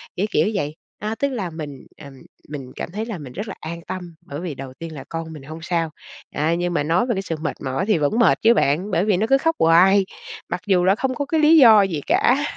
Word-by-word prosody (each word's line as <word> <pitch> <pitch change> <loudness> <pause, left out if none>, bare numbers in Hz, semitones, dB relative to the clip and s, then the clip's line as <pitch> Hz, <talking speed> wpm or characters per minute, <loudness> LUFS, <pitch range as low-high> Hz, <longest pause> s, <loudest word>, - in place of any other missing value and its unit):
kiểu, 190 - 0
kiểu - - +2
vậy, 150 -5 -2 0.2
a, 215 +2 -3
tức 280 +3 0
là 215 -9 -3
mình, 150 -4 -8
ừm, 140 -2 -12 0.4
mình 135 -4 -7
cảm - - -6
thấy 215 +4 -4
là 225 -5 -5
mình 135 -5 -10
rất 205 +4 -5
là 195 - -6
an 170 +1 -7
tâm, 175 -3 -6
bởi 145 -1 -6
vì 170 -5 -5
đầu 130 -1 -8
tiên 165 -1 -7
là 140 - -8
con 165 -1 -5
mình 150 -3 -10
hông 155 +3 -9
sao. 170 -1 -1 0.5
À, 155 +3 +1
nhưng 175 0 -1
mà 145 - +1
nói 165 +8 +2
về 235 -4 -1
cái 190 - -1
sự 170 -4 -4
mệt 155 - -2
mỏi 130 +5 -1
thì 210 -3 +2
vẫn 155 +10 0
mệt 235 - +4
chứ 230 +1 +6
bạn, 180 +3 +1
bởi 175 +2 +1
vì 205 -4 +2
nó 220 - 0
cứ 270 - +6
khóc 325 +3 0
hoài, 185 +4 +5 0.4
mặc 175 0 -3
dù 185 -3 +3
là 190 +2 +4
không 255 +1 -2
có 285 - -2
cái 315 +3 0
lý 310 +2 +6
do 225 -7 +8
gì 170 -7 -1
cả. 275 +4 +3
175 Hz, 265 wpm, -21 LUFS, 155-215 Hz, 0.5 s, do